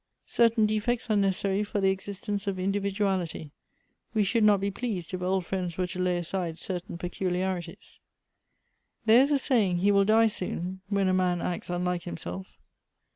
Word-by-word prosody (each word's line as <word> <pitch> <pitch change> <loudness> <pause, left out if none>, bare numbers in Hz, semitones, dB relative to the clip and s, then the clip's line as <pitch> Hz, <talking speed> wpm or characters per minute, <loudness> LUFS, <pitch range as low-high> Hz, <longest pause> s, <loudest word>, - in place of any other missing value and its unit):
" - - -51
Certain 230 -2 +3
defects 215 +2 0
are - - +3
necessary 195 0 +1
for 205 0 -2
the 195 -1 +3
existence 200 +1 -4
of 195 -1 -1
indi 195 +2 0
viduality. 190 -6 -2 0.6
We 215 - +4
should 225 +3 +2
not 210 -2 +5
be 200 +1 -1
pleased, 195 -6 -4
if 185 - -3
old 185 0 0
friends 180 -3 -3
were 185 - +1
to 180 +1 -6
lay 180 -1 +1
aside 175 -1 -3
certain 180 -2 -5
peculiarities." 180 0 -3 1.1
"There 225 +3 +7
is 280 +2 +2
a 285 - +4
saying, 220 -10 +2
'He 200 +4 +3
will 200 0 +4
die 220 +2 +5
soon,' 190 -3 -3
when 200 -2 +1
a 185 - +2
man 180 -1 +2
acts 175 +1 -3
unlike 180 0 -1
himself." 90 +2 -7
190 Hz, 180 wpm, -28 LUFS, 180-205 Hz, 1.1 s, There